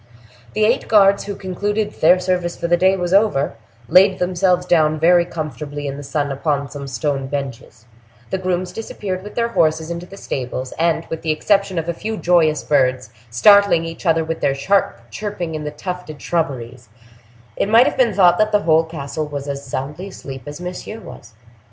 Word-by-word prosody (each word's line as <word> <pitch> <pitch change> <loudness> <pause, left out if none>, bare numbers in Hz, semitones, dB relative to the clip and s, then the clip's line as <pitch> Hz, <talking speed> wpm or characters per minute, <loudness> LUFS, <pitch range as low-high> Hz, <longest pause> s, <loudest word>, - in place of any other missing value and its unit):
The 215 0 +3
eight 235 +4 +1
guards, 200 -2 +4
who 200 0 -5
concluded 205 +3 -2
their 175 +3 +4
service 180 -1 -1
for 170 - -2
the 175 - +4
day 190 +2 +3
was 175 0 -2
over, 195 -9 +2 0.3
laid 185 +6 +5
themselves 180 0 +1
down 155 -3 +2
very 175 +2 +5
comfortably 145 -3 -6
in 140 -1 -3
the 145 - -7
sun 145 0 -2
upon 140 0 -2
some 140 -1 -7
stone 135 +1 -2
benches; 130 -4 -6 0.5
the 190 - -1
grooms 185 -1 -2
disappeared 195 -4 -5
with 205 +2 -10
their 235 0 0
horses 160 -4 +1
into 170 +1 -6
the 195 - -12
stables, 130 -5 -4
and, 165 0 +1
with 165 - -4
the 160 - -4
exception 195 +4 +1
of 165 0 -2
a 170 - -1
few 220 +5 -5
joyous 165 -5 +2
birds, 130 -5 +1 0.2
startling 200 - +5
each 165 +2 -7
other 165 0 +3
with 165 0 -4
their 140 -1 +1
sharp 140 - 0
chirping 175 - -4
in 155 -1 -5
the - - -2
tufted 155 0 -7
shrubberies, 130 -8 -3 0.7
it 200 - -1
might 230 +3 +6
have - - 0
been 235 -6 +2
thought 180 -3 +5
that 215 0 +2
the 210 -1 +2
whole 160 0 +4
castle 155 -1 -5
was 145 -1 -6
as 140 0 -4
soundly 145 +8 -5
asleep 135 -8 -9
as 145 +2 -7
Monsieur 180 +5 -6
was. 120 - -12
165 Hz, 190 wpm, -19 LUFS, 145-185 Hz, 0.7 s, might